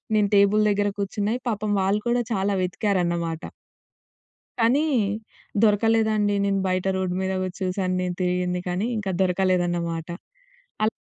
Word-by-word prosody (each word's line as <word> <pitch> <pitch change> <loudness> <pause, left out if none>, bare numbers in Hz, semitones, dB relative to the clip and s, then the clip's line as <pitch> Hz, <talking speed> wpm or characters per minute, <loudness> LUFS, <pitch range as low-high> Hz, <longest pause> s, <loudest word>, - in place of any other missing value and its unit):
నేను 210 -1 +3
టేబుల్ 200 +1 +5
దగ్గర 205 0 +1
కూర్చున్నాయి 205 +4 -1
పాపం 210 -1 -2
వాళ్ళు 200 +2 +1
కూడా 240 0 +2
చాలా 200 0 0
వెతికారన్నమాట. 175 -3 -1 1.2
కానీ 250 +7 +4 0.8
దొరకలేదండి. 215 -1 +3
నేను 195 -1 +1
బయట 185 0 0
రోడ్ 185 -1 -1
మీద 190 0 -1
వచ్చి 185 0 -6
చూసాను, 185 0 -1
నేను 180 -1 -2
తిరిగింది 180 0 0
కానీ 185 +5 -1
ఇంకా 195 -2 -2
దొరకలేదన్నమాట. 175 -3 0 0.8
అలా 220 - -4
195 Hz, 125 wpm, -24 LUFS, 180-210 Hz, 1.2 s, టేబుల్